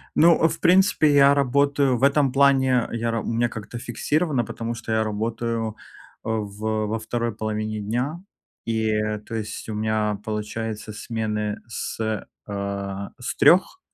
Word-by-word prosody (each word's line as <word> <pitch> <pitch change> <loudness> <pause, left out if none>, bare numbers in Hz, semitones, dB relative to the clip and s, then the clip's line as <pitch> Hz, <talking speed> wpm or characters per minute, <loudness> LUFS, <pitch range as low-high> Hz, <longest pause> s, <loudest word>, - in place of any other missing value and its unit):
Ну, 165 0 +6
в - - -4
принципе, 180 -4 +4
я 140 0 +7
работаю 140 -1 +2
В 135 - -5
этом 140 -1 +4
плане 135 -3 +3
я 115 0 -1
ра 115 -1 -1
У - - -8
меня 120 +1 +1
как-то 110 +2 -7
фиксированно, 145 +3 0
потому 115 +2 -4
что 115 -1 -6
я 110 0 +2
работаю, 115 +1 -2 0.5
э, - - -3
в 110 0 -2
во 110 +1 -2
второй 115 0 -2
половине 110 0 -3
дня. 125 - -2 0.4
И, 110 -1 0 0.3
то 115 - -6
есть 110 0 -5
у - - -3
меня, 105 -1 0
получается, 110 0 -4
смены 105 -1 -3
с, 115 - -5 0.5
э, 100 -1 -4
с 125 - -4
3 190 - +5
115 Hz, 150 wpm, -24 LUFS, 110-135 Hz, 0.5 s, я